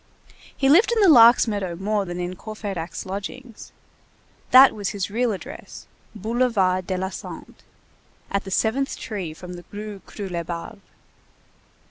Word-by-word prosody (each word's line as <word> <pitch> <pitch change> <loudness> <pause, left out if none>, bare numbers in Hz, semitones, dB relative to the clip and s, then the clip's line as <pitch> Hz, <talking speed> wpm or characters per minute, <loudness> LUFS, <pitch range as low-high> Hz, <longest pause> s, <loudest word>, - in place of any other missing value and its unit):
He 270 - +2
lived 360 - +5
in 465 - +1
the 405 - +5
Lark's 240 -6 +8
meadow 200 -5 -2
more 200 +2 -1
than 175 0 -6
in 180 +1 -4
Courfeyrac's 200 -4 -6
lodgings. 210 +5 -7 0.8
That 265 +1 +8
was 205 -2 -3
his 200 -1 -4
real 240 +2 +1
address: 255 - -9 0.3
Boulevard 210 -4 0
de 185 - -1
la 190 +1 -2
Santé, - - -9 0.8
at 200 - 0
the 195 - -8
seventh 235 +8 0
tree 195 -8 -5
from 180 +3 -10
the 175 0 -9
Rue 205 -1 -7
Croulebarbe. 175 0 -6
205 Hz, 140 wpm, -23 LUFS, 185-235 Hz, 0.8 s, Lark's